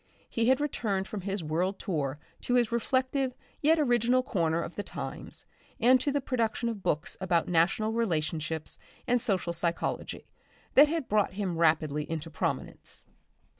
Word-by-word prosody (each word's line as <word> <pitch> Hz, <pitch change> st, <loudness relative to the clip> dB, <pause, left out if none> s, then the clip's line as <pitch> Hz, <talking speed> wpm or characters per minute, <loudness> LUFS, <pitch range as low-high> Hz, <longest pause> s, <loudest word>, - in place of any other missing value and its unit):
He 230 Hz, 0 st, 0 dB
had 260 Hz, +1 st, +5 dB
returned 210 Hz, -10 st, -1 dB
from 210 Hz, -, -5 dB
his 195 Hz, -1 st, -2 dB
world 175 Hz, +6 st, 0 dB
tour 145 Hz, -8 st, -2 dB, 0.2 s
to 245 Hz, -, 0 dB
his 240 Hz, -2 st, +3 dB
reflective 260 Hz, +2 st, 0 dB, 0.3 s
yet 315 Hz, +3 st, +5 dB
original 245 Hz, -2 st, +3 dB
corner 165 Hz, -8 st, +1 dB
of 170 Hz, -, -4 dB
The -, -, -3 dB
Times -, -, -6 dB, 0.3 s
and 250 Hz, +2 st, +6 dB
to 285 Hz, -, +1 dB
the 285 Hz, -, +1 dB
production 235 Hz, -3 st, 0 dB
of 220 Hz, -4 st, -5 dB
books 155 Hz, -3 st, -1 dB
about 175 Hz, -3 st, +2 dB
national 180 Hz, +6 st, +2 dB
relationships 160 Hz, -7 st, -1 dB, 0.3 s
and 245 Hz, -1 st, +2 dB
social 185 Hz, -5 st, 0 dB
psychology, 170 Hz, 0 st, -2 dB, 0.5 s
that 290 Hz, +2 st, +8 dB
had 320 Hz, -3 st, -2 dB
brought 210 Hz, -3 st, +2 dB
him 190 Hz, -3 st, -2 dB
rapidly 155 Hz, -2 st, +2 dB
into 165 Hz, 0 st, -4 dB
prominence. -, -, -3 dB
205 Hz, 155 wpm, -29 LUFS, 165-245 Hz, 0.5 s, that